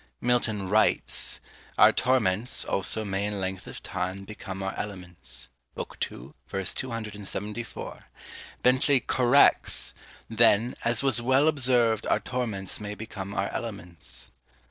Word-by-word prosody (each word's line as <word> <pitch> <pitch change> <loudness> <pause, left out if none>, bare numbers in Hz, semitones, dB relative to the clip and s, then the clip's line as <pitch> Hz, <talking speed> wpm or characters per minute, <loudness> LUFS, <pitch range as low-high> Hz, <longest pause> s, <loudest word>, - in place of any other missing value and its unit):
Milton 115 -5 0
writes, 110 +3 +2 0.4
Our - - +8
torments, 120 -3 +1
also, 105 +3 +2
may 95 0 -2
in 105 -1 -3
length 95 0 -4
of - - -9
time 95 +2 -4
Become 95 -2 -7
our 95 - -3
elements. 90 -10 -4 0.3
B. - - -2 0.3
ii. - - -11 0.2
ver. 95 - -3
274. 105 -1 -5 0.6
Bentley 130 +2 +4
corrects 125 +2 +4 0.3
Then, 115 +1 +4
AS 120 +2 +2
WAS 125 -4 +2
WELL 130 +5 +3
OBSERV'D 120 -6 +2
our - - +3
torments 110 -7 -1
may 105 0 -5
Become 100 -2 -7
our - - 0
elements. 90 - -6
110 Hz, 120 wpm, -27 LUFS, 95-120 Hz, 0.6 s, Our